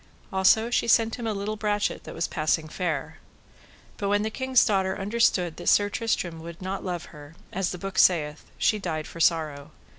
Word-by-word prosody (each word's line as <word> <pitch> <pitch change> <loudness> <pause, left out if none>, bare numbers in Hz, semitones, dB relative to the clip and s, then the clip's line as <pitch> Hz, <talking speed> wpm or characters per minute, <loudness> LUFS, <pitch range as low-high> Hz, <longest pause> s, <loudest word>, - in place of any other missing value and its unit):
Also 220 +5 +4
she 240 - +1
sent 225 -1 +3
him 235 - -3
a - - 0
little 205 +1 -3
brachet 210 -1 -1
that - - -8
was 165 - -1
passing 155 0 0
fair. 155 -4 -3 0.8
But 200 - -2
when 205 +1 +2
the 220 - -2
king's 260 +1 +3
daughter 190 -2 +1
understood 195 -5 +1
that - - 0
Sir 205 0 +4
Tristram 180 -7 -2
would 170 +1 -9
not 190 +1 -4
love 175 -2 -4
her, 150 +1 -12 0.2
as 190 -1 0
the 180 - -5
book 195 +1 -3
saith, 150 -4 +3
she 215 - +2
died 160 -5 -3
for - - -10
sorrow. 155 -3 +1
190 Hz, 190 wpm, -26 LUFS, 165-210 Hz, 0.8 s, Also